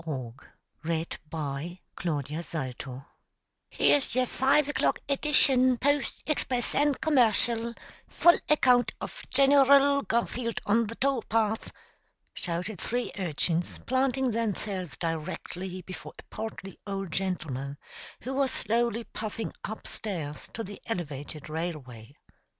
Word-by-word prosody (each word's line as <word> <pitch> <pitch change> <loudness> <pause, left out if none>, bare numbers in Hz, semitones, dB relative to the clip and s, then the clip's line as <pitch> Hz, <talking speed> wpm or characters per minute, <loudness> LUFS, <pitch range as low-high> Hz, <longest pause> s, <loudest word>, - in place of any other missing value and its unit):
E. 130 -6 -3 1.0
FRYATT. 150 -2 -4 0.8
"Here's 285 -3 +3
yer 255 0 +3
five 270 +4 +3
o'clock 290 - +1
e 280 - +2
dishun, 260 -4 +4
Post, 285 0 +1
Express, 255 -5 0
an' 290 -1 +3
Commercial 235 -5 +3 0.3
full 345 0 +5
account 250 -5 +4
of - - -6
Gen 275 0 +5
er 275 -1 +6
ull 280 0 +7
Garfield 235 -1 -1
on 225 +2 +3
the 230 - -6
tow 270 -1 +1
path!" 220 0 +1 0.6
shouted 180 +3 -3
three 245 +1 -1
urchins, 170 0 0
planting 260 0 +2
themselves 205 -5 -2
directly 180 +3 -4
before 185 +1 -8
a - - -11
portly 195 -4 -6
old 195 -3 -3
gentleman 145 -8 -2 0.4
who 260 - -4
was 270 0 +2
slowly 235 0 0
puffing 220 +1 -5
up 220 - -6
stairs 155 -9 -5
to 225 - -2
the 200 0 -9
elevated 150 -7 -4
railway. 145 -7 -5
215 Hz, 115 wpm, -29 LUFS, 165-255 Hz, 1.0 s, ull